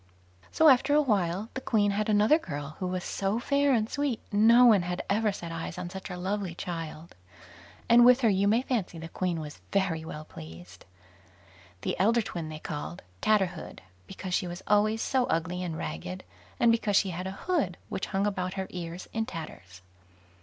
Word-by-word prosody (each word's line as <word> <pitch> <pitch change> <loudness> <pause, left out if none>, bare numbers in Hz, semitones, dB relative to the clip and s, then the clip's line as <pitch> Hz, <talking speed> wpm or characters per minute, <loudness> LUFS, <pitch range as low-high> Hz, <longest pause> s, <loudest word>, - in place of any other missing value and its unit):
So, 320 - +4
after 270 +1 +5
a 300 - +6
while, 200 -3 0
the 265 - -4
Queen 205 -5 +2
had 210 +2 -1
another 215 +9 +4
girl, 145 - -6
who 185 - -2
was 180 0 -3
so 195 +2 -1
fair 280 +3 +2
and 220 -4 +2
sweet, 285 -3 -1
no 230 +4 +6
one 215 -5 +6
had 180 0 -3
ever 215 +1 +2
set 170 -3 -7
eyes 165 +1 -5
on 180 -1 -5
such 190 0 -7
a 180 - -5
lovely 190 -1 -3
child, 165 -2 -6 0.7
and 240 +1 +7
with 250 +2 +7
her 230 - +4
you 195 0 +2
may 225 +5 +3
fancy 220 -10 -2
the 165 0 -7
Queen 175 -1 -2
was 150 -1 -8
very 190 -5 0
well 155 -1 -7
pleased. 85 - -12 1.0
The - - -2
elder 225 +4 +3
twin 165 -5 -5
they 155 - -6
called 155 +2 -6 0.2
"Tatterhood", 190 -6 0 0.3
because 185 - -6
she 180 - +1
was 175 +1 -7
always 215 +2 +2
so 260 -2 +1
ugly 180 +1 -1
and 170 -3 -4
ragged, 185 +5 -5 0.4
and 235 - +5
because 220 -3 +1
she 190 -1 +3
had 180 +2 -4
a - - -3
hood 295 - 0
which - - -4
hung 195 0 0
about 185 -3 -2
her 190 -1 -2
ears 175 0 -6
in 225 0 -1
tatters. 90 - -9
190 Hz, 190 wpm, -28 LUFS, 170-220 Hz, 1.0 s, and